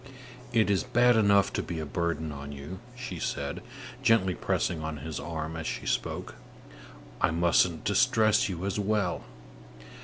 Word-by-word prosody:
"It 110 -3 +3
is 95 -4 +3
bad 120 +5 +4
enough 100 -3 +4
to - - 0
be 85 - -5
a 80 - -3
burden 80 0 -2
on 70 0 -7
you," 70 +7 -7 0.2
she 125 -9 -6
said, 70 -2 -3 0.4
gently 100 -5 +4
pressing 85 -2 -1
on 80 -1 -4
his 80 0 -5
arm 80 -1 -4
as 80 0 -4
she - - -4
spoke; - - -2 0.9
"I - - +4
mustn't 85 0 +2
distress 110 0 +3
you 90 0 -4
as 100 +1 -1
well. 105 -3 0
90 Hz, 155 wpm, -29 LUFS, 80-105 Hz, 0.9 s, bad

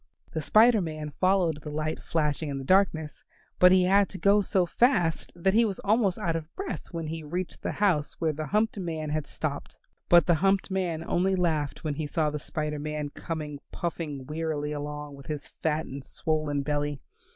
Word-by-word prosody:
The 160 - -2
Spider 220 +7 +5
Man 155 -3 -4
followed 180 -3 +1
the 150 - -7
light 155 +1 -2
flashing 150 -1 -1
in 140 - -3
the 135 - -5
darkness, 160 -2 +2 0.4
but 180 0 +8
he 185 -1 +6
had 195 +2 +4
to 195 - -8
go 200 +2 +4
so 190 -2 +2
fast 175 -4 +2
that 190 +3 +1
he 230 +2 +5
was 205 -4 -1
almost 205 -3 +2
out 165 -2 -1
of 165 0 -5
breath 390 0 -5
when 165 -2 -4
he 160 +1 -4
reached 175 +4 -4
the - - -2
house 180 -8 +1
where 160 -2 +1
the 155 +1 -4
humped 215 0 +1
man 160 -4 -3
had 155 -1 -2
stopped. 145 -2 -5 0.3
But 175 0 +7
the 175 - +4
humped 195 0 +2
man 175 -4 -1
only 190 +3 +1
laughed 160 -6 -1
when 155 -2 -1
he 150 +1 -3
saw 155 0 0
the 150 - -3
Spider 150 0 -3
Man 150 0 -3
coming 150 -2 -5
puffing 155 -6 -4
wearily 150 0 -2
along 150 0 -5
with 140 - -13
his 150 -2 -5
fat 160 0 0
and 135 +1 -7
swollen 150 -1 -1
belly. 145 0 -1
160 Hz, 195 wpm, -28 LUFS, 150-185 Hz, 0.4 s, but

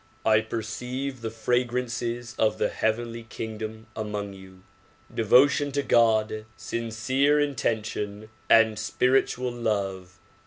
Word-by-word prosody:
I 110 -1 +5
perceive 125 +4 -4
the 115 - -3
fragrances 120 +1 -1
of 110 -1 +2
the - - +1
heavenly 115 +1 -1
kingdom 110 0 -6
among 105 -2 -4
you; 95 -1 -14 0.5
devotion 140 +6 +4
to 140 0 0
God. 110 -3 +3
sincere 130 +6 +1
intention 110 -6 -2 0.2
and 110 -1 +5
spirit 130 +1 +2
ual 125 -1 -4
love. 95 -4 -2
115 Hz, 110 wpm, -26 LUFS, 110-125 Hz, 0.5 s, I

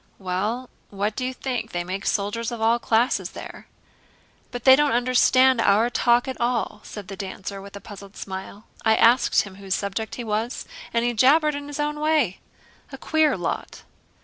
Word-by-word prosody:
"Well, 205 +7 -3 0.2
what 205 +2 -2
do 255 - -3
you 255 - -1
think? 255 -1 -4
They 175 0 -1
make 190 +2 -5
soldiers 210 +3 -1
of 235 - -5
all 225 +2 +3
classes 235 +1 +1
there." - - -9 0.8
"But 245 -2 -7
they 260 0 +9
don't 295 -1 +2
understand 255 +1 +4
our 220 +4 +3
talk 240 0 +3
at 260 - -5
all," 235 -3 -1
said 205 -3 -9
the 195 - -7
dancer 195 0 -6
with 200 +1 -11
a 200 - -8
puzzled 200 -1 -12
smile. 190 +2 -7 0.2
"I 220 -1 +4
asked 240 +3 +4
him 195 -2 -11
whose 195 -1 -2
subject 200 +2 -4
he 245 - -5
was, 220 +2 -2 0.3
and 230 0 +1
he 240 - +1
jabbered 300 +7 +4
in 285 0 -6
his 290 0 -7
own 295 0 -1
way. 300 - +1 0.5
A 270 - -7
queer 315 +2 +2
lot!" - - -4
230 Hz, 185 wpm, -24 LUFS, 200-255 Hz, 0.8 s, they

